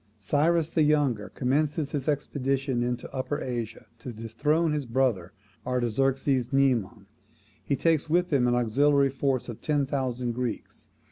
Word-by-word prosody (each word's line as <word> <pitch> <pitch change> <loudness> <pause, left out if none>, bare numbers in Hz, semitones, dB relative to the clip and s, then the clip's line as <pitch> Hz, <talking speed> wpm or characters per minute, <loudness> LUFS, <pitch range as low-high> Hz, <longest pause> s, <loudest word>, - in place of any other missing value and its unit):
Cyrus 155 - +1
the 160 - +1
Younger 145 -8 +2
commences 145 +3 -1
his 140 -3 -3
expedition 135 -3 -1
into 120 0 -2
Upper 135 +2 -2
Asia 120 -3 -5
to 125 - -7
dethrone 145 +9 0
his 145 -4 -2
brother 115 -8 0 0.3
Artaxerxes 130 +1 0
Mnemon. 120 -7 +1 0.6
He 140 - 0
takes 160 0 +1
with 175 0 +1
him 125 -3 +3
an 120 - +2
auxiliary 140 +4 +3
force 135 -2 -1
of 120 -3 -8
ten 145 -2 +1
thousand 125 -3 -2
Greeks. 120 -1 -5
135 Hz, 140 wpm, -27 LUFS, 120-145 Hz, 0.6 s, him